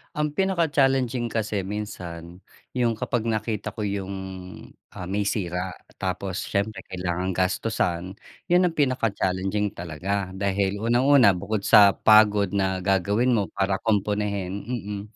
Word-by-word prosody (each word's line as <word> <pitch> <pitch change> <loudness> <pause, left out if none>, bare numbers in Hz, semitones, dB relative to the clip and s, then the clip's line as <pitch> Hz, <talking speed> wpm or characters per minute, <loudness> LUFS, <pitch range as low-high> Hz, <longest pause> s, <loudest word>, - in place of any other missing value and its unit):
Ang 150 -1 -1
pinaka 190 -3 +1
challenging 130 -5 +1
kasi 105 -3 -1
minsan, 90 -3 -7 0.3
yung 120 -3 +1
kapag 120 -3 -1
nakita 110 -2 -2
ko 110 - -12
yung, 100 -2 -3 0.8
ah, 90 - -7
may 100 +2 -1
sira 90 -2 -2 0.2
tapos 95 0 -3
siyempre 100 +2 -1
kailangang 90 0 -3
gastusan 90 -1 -1 0.4
yun 180 +1 +5
ang 165 - -5
pinaka 130 -6 +1
challenging 95 +2 -1
talaga 90 +4 -3
dahil 100 +1 -1
unang-una 125 0 +5
bukod 100 +3 -3
sa 100 -3 +7
pagod 105 -3 +5
na 95 -2 0
gagawin 100 +6 +2
mo 105 -5 +1
para 95 -1 0
kumpunihin, 100 -2 -1 0.2
mm, 105 -5 -4
100 Hz, 130 wpm, -25 LUFS, 95-115 Hz, 0.8 s, sa